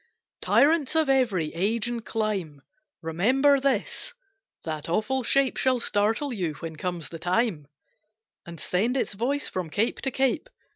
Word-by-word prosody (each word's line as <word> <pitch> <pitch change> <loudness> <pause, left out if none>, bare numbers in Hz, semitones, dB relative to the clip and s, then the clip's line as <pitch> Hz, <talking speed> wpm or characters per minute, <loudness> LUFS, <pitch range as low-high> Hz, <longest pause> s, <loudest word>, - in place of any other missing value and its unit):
Tyrants 305 0 +3
of 315 -3 +3
every 220 - +1
age 215 +7 0
and 240 -1 -3
clime 195 - -3 0.4
Remember 255 - +3
this, 275 - -1 0.5
that 155 -1 -4
awful 240 +9 0
shape 270 +2 +2
Shall 255 -1 +2
startle 225 +6 0
you 175 -8 -2
when 160 +1 -7
comes 175 0 -4
the 165 - -8
time, 180 - 0 0.8
And 170 -1 -10
send 225 +9 0
its 250 - -1
voice 260 +8 -1
from 180 -3 -4
cape 210 +8 0
to 270 - 0
cape. 265 - 0
220 Hz, 145 wpm, -26 LUFS, 175-265 Hz, 0.8 s, Tyrants